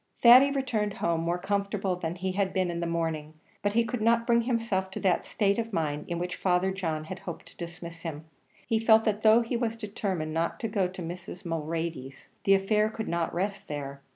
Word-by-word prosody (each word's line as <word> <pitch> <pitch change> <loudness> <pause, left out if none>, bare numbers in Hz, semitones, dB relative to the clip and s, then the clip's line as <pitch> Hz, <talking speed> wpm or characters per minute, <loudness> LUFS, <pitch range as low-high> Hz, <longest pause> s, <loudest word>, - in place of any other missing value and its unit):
Thady 250 +4 +9
returned 245 -7 -1
home 170 -1 0
more 170 +1 0
comfortable 200 0 -1
than 175 -1 -4
he 185 +1 -2
had 195 0 0
been 185 -2 +1
in 170 - -3
the 170 - -1
morning, 160 -2 -2 0.3
but 205 0 0
he 230 +1 +3
could 225 0 -3
not 230 +1 +3
bring 235 -1 +4
himself 230 -6 -1
to 190 - -6
that 185 -2 +1
state 200 0 +1
of 230 0 -3
mind 150 -5 -1
in 170 - -2
which 180 +1 -3
Father 185 0 +2
John 165 -5 -2
had 185 +4 -7
hoped 175 -3 -7
to - - -20
dismiss 170 -1 -8
him. 160 -2 -6 0.4
He 225 -2 +1
felt, 225 0 +5
that 215 -1 0
though 220 +2 +6
he 235 +1 -2
was 230 -1 -1
determined 195 -7 -3
not 165 +1 -1
to 225 - 0
go 200 -3 +1
to 185 0 -8
Mrs. 175 +2 -7
Mulready's, 160 -4 -4 0.2
the 195 - +6
affair 210 +2 +2
could 220 0 -5
not 170 -1 -1
rest 195 +3 -3
there. 140 -2 -5
190 Hz, 215 wpm, -28 LUFS, 170-215 Hz, 0.4 s, Thady